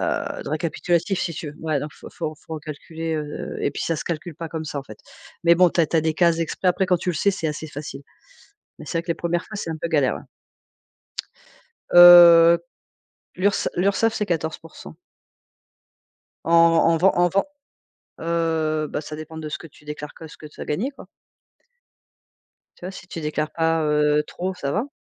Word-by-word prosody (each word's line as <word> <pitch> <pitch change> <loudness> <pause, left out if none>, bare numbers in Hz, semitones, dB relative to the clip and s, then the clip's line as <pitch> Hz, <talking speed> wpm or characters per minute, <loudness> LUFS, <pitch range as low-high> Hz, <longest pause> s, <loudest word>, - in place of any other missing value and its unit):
heu, - - -2
de - - -6
récapitulatif 170 +4 -1
si 170 - -2
tu 150 - -6
veux, 150 - -16
ouais, 155 -3 -1
donc 150 - -5
faut - - -12
faut 155 -2 -5
faut 160 - -6
recalculer, 160 +2 -6
heu 150 -1 -5
et - - 0
puis, - - -4
ça 165 - -1
se - - -5
calcule 170 0 -5
pas 165 0 -6
comme 160 0 -5
ça, 150 - -5
en - - -5
fait. 110 -5 -12 0.5
Mais 170 0 +6
bon, 180 0 +5
tu 170 - +1
as 165 - +3
tu 165 - -1
as - - +4
des 160 0 0
cases 170 0 +3
exprès. 165 +3 -1
Après 185 +1 +1
quand 180 -1 +3
tu 175 - -5
le - - -4
sais, 200 - +2
c'est 165 -4 -3
assez 155 +1 -5
facile. 145 -1 -8 0.8
Mais - - -10
c'est 165 - -2
vrai - - -2
que - - -23
les - - -9
1res 170 +1 -2
fois, 215 - -11
c'est 185 -5 -4
un 160 - -4
peu - - -3
galère, 145 -6 +2
ouais. - - -10 1.7
Heu, 170 -1 +9 0.8
L'URSSA 200 +3 +1
l'URSSAF 200 +5 +1
c'est 210 - -2
14%. 165 -2 -5 1.5
En 165 - -1
en 165 0 +5
vend 190 +4 +4
en 175 0 +3
vend 195 +3 +1 0.8
heu 160 -2 -1
bah, 150 - -4
ça 155 0 -8
dépend 155 +1 -9
de 155 -1 -6
ce 150 - -4
que - - -12
tu 150 - -22
déclares 150 0 -7
que 160 - -11
ce - - -14
que - - -12
tu 150 - -12
as - - -5
gagné, 215 - -2
quoi. - - -14 1.7
Tu - - -14
vois? 185 - -4
Si 180 -2 -12
tu 170 - -6
déclares 150 0 -2
pas, 165 -1 +1
heu, 150 0 +2
trop, 185 +2 -4
ça 140 -6 -4
va. 230 - -1
165 Hz, 210 wpm, -22 LUFS, 155-175 Hz, 1.7 s, Heu